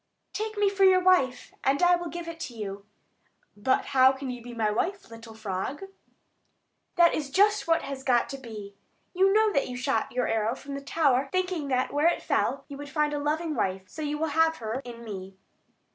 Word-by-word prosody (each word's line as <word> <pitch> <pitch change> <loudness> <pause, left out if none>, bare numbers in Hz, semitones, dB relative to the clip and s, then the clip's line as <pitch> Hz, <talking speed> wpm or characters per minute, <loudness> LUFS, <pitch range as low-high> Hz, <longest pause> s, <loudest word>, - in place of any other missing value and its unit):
"Take 435 0 -4
me 410 0 +3
for 390 0 +1
your 375 -1 +7
wife, 320 -9 +2
and 275 +4 +2
I 355 0 +6
will 345 -1 -4
give 345 0 -6
it 335 0 -7
to 260 -8 -6
you." 200 -2 -6 0.7
"But 260 +6 +1
how 260 0 +7
can 265 -1 -5
you 245 -1 -7
be 240 +1 -9
my 220 -2 +1
wife, 355 - -2
little 225 -1 -11
frog?" 215 - -4 1.1
"That 345 -1 +5
is 290 -3 -2
just 410 +4 +3
what 330 0 +2
has 275 -1 -6
got 245 -3 +2
to 275 - -5
be. 215 -5 -9 0.4
You 385 +1 +4
know 430 +1 +3
that 280 - +1
you 250 - -5
shot 250 -3 -1
your 250 -1 0
arrow 225 +2 0
from 280 +1 -9
the 280 - -5
tower, 275 -3 +1
thinking 365 -5 -1
that 255 -1 0
where 295 +3 +3
it 345 - +1
fell, - - 0
you 280 - -8
would 290 0 -8
find 300 0 0
a 290 - -1
loving 310 +2 -1
wife; 190 -6 -1
so 250 - -9
you 295 0 -2
will 320 +1 -1
have 325 0 +3
her 225 +3 -4
in 235 -1 -9
me." 195 -3 -8
275 Hz, 215 wpm, -27 LUFS, 235-335 Hz, 1.1 s, your